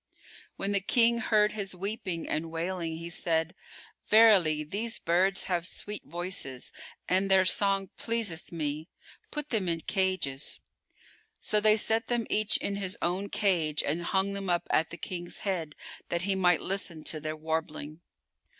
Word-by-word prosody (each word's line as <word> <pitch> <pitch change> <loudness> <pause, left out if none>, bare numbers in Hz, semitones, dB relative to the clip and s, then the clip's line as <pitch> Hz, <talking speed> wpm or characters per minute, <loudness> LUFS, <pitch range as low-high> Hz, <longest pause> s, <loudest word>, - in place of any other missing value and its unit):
When 195 - -2
the 200 - +3
King 235 +3 +3
heard 215 -2 +3
his 200 -3 -4
weeping 185 -3 -3
and 160 +1 -2
wailing, 165 0 -3
he 170 +1 -6
said, 165 -1 0 0.5
"Verily 195 -9 +6
these 210 +9 -3
birds 185 +3 +2
have 175 -2 0
sweet 210 +2 -3
voices 175 -7 -3 0.3
and 190 +2 +2
their 190 -1 +5
song 195 0 +1
pleaseth 225 -8 -2
me: 155 -1 -3 0.4
put 300 -1 -4
them 205 -6 +1
in 165 -1 -1
cages." 185 -9 -1 0.8
So 210 - +3
they 215 +1 +5
set 225 +2 +1
them 240 -2 0
each 215 0 +4
in 200 - -3
his 190 -2 -3
own 185 +4 -1
cage 170 -8 +1
and 155 +4 -1
hung 190 +3 0
them 195 -1 -4
up 175 -1 +1
at 160 - +3
the 170 - -7
King's 175 0 -5
head 170 -7 -2 0.3
that 170 +1 -1
he 195 +1 +1
might 180 -3 +3
listen 185 -5 -3
to 155 - -2
their 155 +1 -4
warbling. 155 0 -4
185 Hz, 160 wpm, -29 LUFS, 165-200 Hz, 0.8 s, Verily